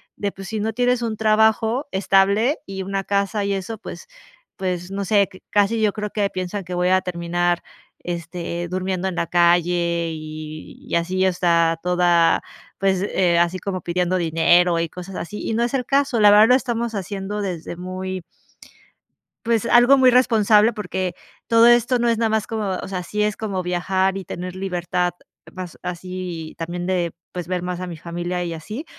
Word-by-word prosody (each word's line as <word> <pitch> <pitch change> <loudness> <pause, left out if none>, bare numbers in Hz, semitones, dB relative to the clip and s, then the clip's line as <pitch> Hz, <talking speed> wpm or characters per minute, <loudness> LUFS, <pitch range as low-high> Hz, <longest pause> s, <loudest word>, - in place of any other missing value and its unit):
de, 200 -1 -2
pues, 195 0 -10
si 220 +1 -3
no 220 +1 -1
tienes 245 +1 +1
un 225 -2 -2
trabajo 220 +4 +2
estable 200 +7 +2
y 195 0 -5
una 195 +1 -2
casa 200 +1 0
y 200 - 0
eso, 195 +3 -4
pues 470 - -9 0.5
pues, 180 -2 -3
no 200 0 -3
sé, 200 0 +3
que 185 -1 -16
casi 210 +2 +2
yo 215 -1 +3
creo 210 0 -5
que 210 - -2
ahí 200 - +2
piensan 185 +2 -4
que 180 0 -6
voy 180 +1 +1
a 185 0 +4
terminar, 175 -1 -1 0.4
este, 170 0 -5
durmiendo 185 0 -2
en 185 - -6
la 170 - 0
calle 170 0 +2
y 155 0 -9
y - - -2
así, 185 +3 +1
o 185 - +1
sea, 170 -2 +2
toda 175 -2 +3 0.4
pues, 190 -1 +1
eh, 180 -3 +2
así 175 +2 +1
como 185 -2 -4
pidiendo 180 +1 0
dinero 170 +1 +3
y 165 - 0
cosas 180 +3 -9
así. 210 +5 -6
Y - - -2
no 235 - +1
es 240 - -2
el 265 -2 0
caso, 275 -3 +1
la 210 -1 +7
verdad 210 +2 +7
lo 250 - +7
estamos 235 -3 -1
haciendo 200 +1 -4
desde 175 -4 -4
muy 185 0 -5 1.2
pues, 230 -1 +1
algo 245 +3 +6
muy 260 -1 +6
responsable, 225 -3 +4
porque 185 -4 -3 0.3
todo 230 0 +5
esto 240 +1 +4
no 240 0 +1
es 230 -1 +2
nada 225 -1 +2
más 220 -1 0
como 220 -3 -3
o - - -6
sea, 185 -2 -3
sí 210 +4 -2
es 210 0 0
como 200 -4 -3
viajar 185 +2 0
y 195 - -5
tener 180 +2 -6
libertad, 180 -1 -1 0.4
más 185 -2 -8
así 180 -2 -6
también 175 +1 -4
de 175 -3 0 0.2
pues 175 -2 -5
ver 180 -1 -2
más 180 0 -4
a 185 - -4
mi 175 -2 -7
familia 175 +2 -4
y 170 - -4
así, 210 - -6
185 Hz, 195 wpm, -22 LUFS, 175-210 Hz, 1.2 s, la